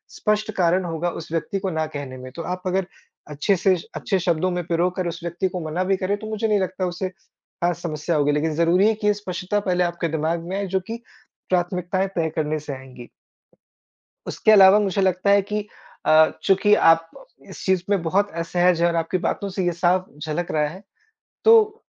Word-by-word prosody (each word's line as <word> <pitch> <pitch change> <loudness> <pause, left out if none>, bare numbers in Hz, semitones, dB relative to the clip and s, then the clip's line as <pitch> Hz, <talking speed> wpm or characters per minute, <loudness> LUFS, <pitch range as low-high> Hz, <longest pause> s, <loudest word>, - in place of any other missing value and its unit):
स्पष्ट 215 0 0
कारण 180 +1 +2
होगा 170 +1 -2
उस 165 -2 -8
व्यक्ति 195 +5 -2
को 190 -1 -2
ना 160 0 -1
कहने 135 -2 -6
में, 130 0 -9
तो 165 - -7
आप 180 +2 -4
अगर 185 0 0 0.4
अच्छे 150 +7 +1
से 185 +1 +3
श 165 - -9
अच्छे 195 - -1
शब्दों 175 +1 0
में 175 0 -2
पिरो 170 +1 +1
कर 180 -1 -2
उस 170 0 -5
व्यक्ति 170 +2 -2
को 180 -1 -5
मना 180 +4 -1
भी 190 0 +1
करें 195 +2 -1
तो 215 - -8
मुझे 220 +1 -1
नहीं 210 -2 +2
लगता 185 0 -2
उसे 180 +2 -3
ख़ास 175 -2 -6
समस्या 155 0 -2
होगी, 145 -1 +2
लेकिन 155 +2 0
ज़रूरी 170 +5 +3
है 220 - +3
कि 210 -1 -2
ये 210 - +5
स्पष्टता 200 0 -3
पहले 180 -2 0
आपके 170 -1 -2
दिमाग 160 +2 -1
में 195 - -2
आए 200 - -2
जो 190 +1 0
कि 230 +1 -6 0.5
प्राथमिकताएँ 180 +1 0
तय 160 -1 +1
करने 155 0 -1
से 150 -1 -6
आएँगी। 130 -2 -11 1.2
उसके - - +1
अलावा 195 -1 +8
मुझे 195 -1 0
लगता 190 +1 +1
है 200 0 +5
कि 210 +1 -4 0.4
अ, 155 0 +6
चूँकि 205 +2 +4
आप 165 -3 +4 0.4
इस - - -9
चीज़ 190 -2 +2
में 200 -4 +2
बहुत 195 +5 +1
असहज 175 0 +2
हैं 175 - +4
और 170 - -1
आपकी 165 +3 -1
बातों 200 - -1
से 190 - -1
ये 175 - +1
साफ 180 +2 +1 0.2
झलक 170 +3 -3
रहा 150 -1 +1
है, 185 +5 -10 0.6
तो 445 0 +5
180 Hz, 210 wpm, -22 LUFS, 165-195 Hz, 1.2 s, अलावा